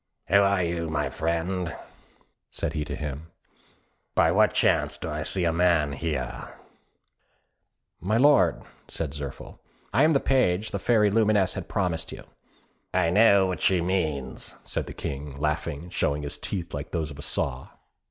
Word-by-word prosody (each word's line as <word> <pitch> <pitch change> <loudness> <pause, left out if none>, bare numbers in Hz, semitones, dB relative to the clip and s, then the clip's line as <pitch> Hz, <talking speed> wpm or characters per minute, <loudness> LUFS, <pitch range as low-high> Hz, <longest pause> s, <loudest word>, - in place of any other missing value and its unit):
"Who 100 - +3
are 100 -2 +2
you, 85 -1 -2
my 75 -2 -1
friend?" 85 +1 -2 0.7
said - - -3
he 75 - -2
to - - -5
him. 75 +1 -6 0.9
"By 80 - +4
what 105 +3 +3
chance - - +2
do - - -6
I - - -3
see 90 -2 0
a 85 - +2
man 85 -4 +3
here?" 80 +1 -4 1.4
"My 105 +6 0
lord," 145 +3 +4 0.2
said 75 -4 -5
Zirphil, 70 -2 -8 0.3
"I 130 - +3
am 160 +1 +5
the 140 - +4
page 110 -8 +1
the 100 - -2
Fairy 105 -1 +3
Lumineuse 105 -3 +3
has - - -5
promised 90 -5 -2
you." - - -9 0.7
"I 90 -2 +2
know 100 -1 +6
what 90 -1 -3
she 95 -2 +3
means," 80 -7 -2
said - - -4
the - - -7
King, 70 0 -6
laughing, 75 0 -2
and 90 - -12
showing 75 +1 0
his 70 - -4
teeth, 85 -4 -4
like 70 +1 -5
those 80 -3 -2
of 70 - -11
a - - -6
saw. 65 -2 -2
85 Hz, 165 wpm, -26 LUFS, 75-100 Hz, 1.4 s, know